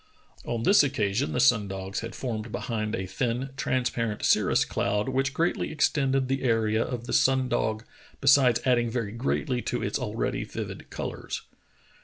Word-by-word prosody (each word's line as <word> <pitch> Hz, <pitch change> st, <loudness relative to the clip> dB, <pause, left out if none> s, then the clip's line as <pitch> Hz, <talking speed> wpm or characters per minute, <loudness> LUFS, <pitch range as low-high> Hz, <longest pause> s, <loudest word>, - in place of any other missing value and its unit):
On 115 Hz, -1 st, -2 dB
this 200 Hz, -, +6 dB
occasion 130 Hz, -3 st, 0 dB
the -, -, -1 dB
sun 120 Hz, -5 st, +4 dB
dogs 95 Hz, 0 st, -4 dB
had 115 Hz, -, -6 dB
formed 115 Hz, -3 st, -4 dB
behind 110 Hz, -2 st, -2 dB
a 95 Hz, -, -3 dB
thin, 120 Hz, +7 st, -2 dB
transparent 120 Hz, -4 st, -1 dB
cirrus -, -, +3 dB
cloud 105 Hz, +3 st, -1 dB
which 135 Hz, +1 st, 0 dB
greatly 165 Hz, +5 st, 0 dB
extended 135 Hz, -3 st, +1 dB
the 135 Hz, +1 st, -1 dB
area 115 Hz, -2 st, +2 dB
of 120 Hz, -2 st, -5 dB
the -, -, -4 dB
sun 130 Hz, -1 st, +3 dB
dog 110 Hz, -3 st, -1 dB, 0.4 s
besides 130 Hz, -4 st, +5 dB
adding 120 Hz, -2 st, +3 dB
very 115 Hz, -3 st, -2 dB
greatly 125 Hz, +2 st, -1 dB
to -, -, -2 dB
its -, -, -1 dB
already -, -, -2 dB
vivid -, -, -7 dB
colors. -, -, -5 dB
120 Hz, 160 wpm, -27 LUFS, 110-135 Hz, 0.4 s, this